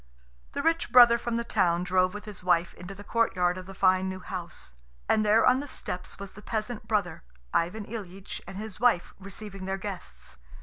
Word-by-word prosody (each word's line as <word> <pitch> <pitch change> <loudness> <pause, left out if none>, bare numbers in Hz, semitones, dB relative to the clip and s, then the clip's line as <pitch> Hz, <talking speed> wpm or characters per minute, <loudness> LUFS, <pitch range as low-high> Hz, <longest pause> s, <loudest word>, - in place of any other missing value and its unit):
The - - -2
rich 330 -5 +1
brother 240 -1 +8
from 235 -1 -1
the 235 - -1
town 175 -6 +2
drove 185 +1 +2
with 205 - -7
his 210 -4 -7
wife 175 -1 +2
into 185 +2 -9
the 205 - -10
courtyard 185 -6 +1
of 185 - -10
the 195 - -9
fine 185 0 +3
new 185 0 -5
house. 175 - -6 0.3
And 215 - +3
there 215 +2 +5
on 255 +1 +5
the 290 - -5
steps 180 -8 -5
was 200 -1 -8
the 210 - -12
peasant 220 +1 -4
brother, 200 -7 0 0.3
Ivan 190 +6 0
Ilyitch, 195 -4 -7
and 190 - -7
his 210 -2 -6
wife, 235 -7 +3
receiving 195 0 -7
their 190 0 -1
guests. 185 - -6
195 Hz, 200 wpm, -28 LUFS, 185-220 Hz, 0.3 s, brother